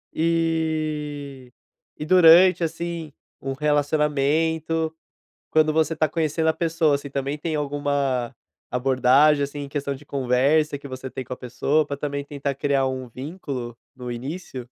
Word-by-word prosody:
E 155 -5 -1 0.5
e 150 - -5
durante, 180 +1 +7
assim, 165 -2 -4 0.3
um 135 0 -3
relacionamento, 150 +2 +1 0.6
quando 155 0 +3
você 160 +1 +2
está 155 -1 +1
conhecendo 160 0 0
a - - +4
pessoa, 160 -3 +1
assim, 140 0 -8
também 140 +2 -3
tem 160 +1 -3
alguma 140 -4 -1 0.4
abordagem, 135 +3 +4
assim, 145 +1 -6
em 140 - -6
questão 140 -1 -3
de 145 +2 -12
conversa 140 +3 +1
que 140 - -10
você 130 0 -6
tem 130 0 -6
com 125 - -9
a - - -3
pessoa, 140 +5 0
pra 140 - -4
também 140 0 -3
tentar 140 -1 -3
criar 140 -1 +1
um 130 -1 -4
vínculo, 130 -3 -6 0.2
no 125 -1 -7
início? 135 +4 -6
145 Hz, 145 wpm, -23 LUFS, 135-160 Hz, 0.6 s, durante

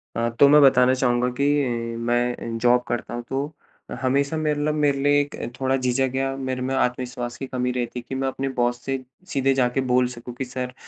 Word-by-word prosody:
अ, 115 0 0
तो 140 - +8
मैं 150 +1 +7
बताना 130 -2 +6
चाहूँगा 125 -1 +1
कि 140 - +3 0.5
मैं 120 0 -1
जॉब 125 +1 +4
करता 120 - -3
हूँ 120 0 -4
तो 140 +3 -2 0.5
हमेशा 140 +4 +1
मेरे 150 -1 0
लब 150 0 +1
मेरे 145 -2 +2
लिए 145 0 +4
एक 145 +1 -5 0.2
थोड़ा 130 0 +1
झिझक 130 0 0
या 135 0 -1
मेरे 130 -1 -3
में 130 +1 -2
आत्मविश्वास 125 -1 -2
की 135 - -5
कमी 125 -1 -1
रहती 125 -1 -3
है 120 - -10
कि 130 - -3
मैं 135 0 -1
अपने 135 +1 -2
बॉस 120 0 +1
से 135 0 -1 0.3
सीधे 135 -4 +1
जाकर 130 0 +1
बोल 125 0 +4
सकूँ 125 0 -9
कि 130 - -3
सर 125 0 -5
130 Hz, 210 wpm, -23 LUFS, 125-135 Hz, 0.5 s, तो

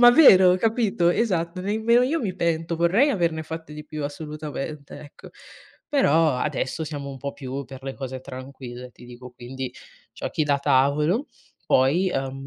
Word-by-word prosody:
Ma 240 0 +9
vero, 190 - +7
capito? 210 -5 +1
Esatto, 180 -4 -1
nemmeno 220 +5 +2
io 305 +6 +1
mi 195 -7 -3
pento. 170 -1 -1
Vorrei 195 - +3
averne 170 -7 0
fatte 160 -1 -8
di 150 0 -8
più, 155 -1 -6
assolutamente, 150 -1 -6
ecco. 145 - -13 0.6
Però 165 - +3
adesso 130 +4 -2
siamo 145 -2 -6
un 135 - -9
po' 140 +2 -5
più 135 0 -6
per 130 +1 -11
le 135 0 -5
cose 130 -1 -6
tranquille, 130 -1 -9
ti 120 - -16
dico 125 +1 -11
quindi 125 +1 -7 0.4
giochi 155 - -3
da 145 -1 +2
tavolo, 145 - +2 0.4
poi, 150 +9 +3
ehm, 135 0 -4
150 Hz, 160 wpm, -24 LUFS, 135-180 Hz, 0.6 s, Ma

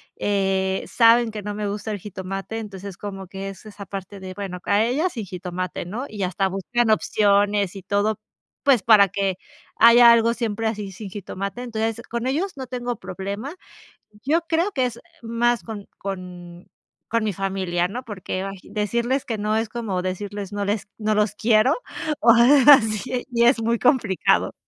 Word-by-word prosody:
eh, 190 -1 0
saben 230 0 +5
que 210 -2 -7
no 205 0 -4
me 210 0 -3
gusta 210 +2 -4
el 205 - -4
jitomate, 195 +2 -6
entonces 200 -3 -7
como 195 -2 -7
que 195 +1 -6
es 195 - -11
esa 200 -1 -9
parte 195 +1 -7
de, 185 -1 -7
bueno, 195 -2 -5
a 205 +1 +3
ella 280 +10 +1
sin 230 -9 -6
jitomate, 180 -1 -5
¿no?, 230 +9 -5
y 205 -3 -4
hasta 190 +2 0
buscan 220 +5 -1
opciones 205 -2 +2
y 195 - -8
todo, 205 +2 0 0.4
pues, 265 -7 +4
para 210 -3 +6
que 195 -1 -1 0.4
haya 235 +1 +8
algo 230 0 +4
siempre 225 -2 -3
así 210 -3 -2
sin 195 0 -9
jitomate. 200 +3 -5
Entonces, 225 -1 -2
con 235 +1 -3
ellos 320 +9 -1
no 260 - -5
tengo 245 -1 -4
problema. 200 +9 -6 0.7
Yo 320 +5 +2
creo 340 +5 +1
que 255 -1 +1
es 235 -1 -6 0.2
más 235 +1 +1
con 210 -3 -8
con 180 -2 -8 0.4
con 230 0 +1
mi 210 - 0
familia, 185 -2 -1
¿no?, 245 +6 -5
porque, 190 -3 -5
ay, 195 0 -5
decirles 235 +5 -1
que 225 - -2
no, 210 +1 -1
es 225 -1 -2
como 215 -6 -3
decirles 200 +2 -5
no 205 0 -2
les 205 0 -2
no 215 -1 0
los 210 -1 +1
quiero, 220 +4 +3 0.5
o 230 - +7
algo 260 +4 +6
así, 240 +1 +2
y 235 -1 +2
es 240 -1 +4
muy 230 +1 +1
complicado. 230 -7 +2
210 Hz, 180 wpm, -23 LUFS, 195-235 Hz, 0.7 s, haya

